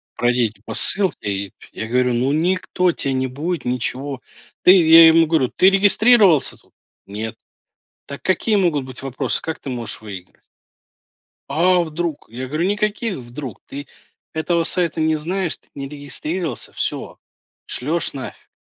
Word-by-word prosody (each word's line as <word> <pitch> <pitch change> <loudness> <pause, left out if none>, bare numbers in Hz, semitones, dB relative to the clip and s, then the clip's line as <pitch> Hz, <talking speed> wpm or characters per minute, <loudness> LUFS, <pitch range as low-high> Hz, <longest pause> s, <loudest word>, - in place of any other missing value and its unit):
пройдите 120 -4 0
по - - -6
ссылке 190 - +2
и" 100 -1 -4 0.2
Я 110 - -5
говорю: 125 +1 +1
"Ну 125 +3 +1
никто 180 +2 +1
те 140 - -3
не 130 0 0
будет, 155 +7 -4
ничего" 125 +2 -3 0.4
"Ты,- 180 - +8
я 165 0 +9
ему 165 0 +6
говорю.- 155 -6 +2
Ты 185 - +6
регистрировался 200 - +4
тут? - - -28 0.3
Нет. 110 +3 -5 0.7
Так 140 - -8
какие 210 +3 +1
могут 165 -8 +1
быть 130 -1 -11
вопросы? 135 -1 -2
Как 160 - -5
ты 135 - -7
можешь 120 -2 -5
выиграть?" 100 -4 -10 1.1
"А 180 +3 +3
вдруг?" 160 -1 -4
Я 125 +3 -6
говорю: 155 +5 -1
"Никаких 210 0 -1
'вдруг', 125 -1 -8
ты 140 0 -7 0.5
этого 165 +2 0
сайта 170 -1 -1
не 155 0 +2
знаешь, 175 +3 -2
ты - - -35
не 140 -1 -5
регистрировался- 150 +2 -5
всё, - - -4 0.5
шлешь 160 +7 -2
нафиг". 135 -2 -8
150 Hz, 150 wpm, -20 LUFS, 125-175 Hz, 1.1 s, я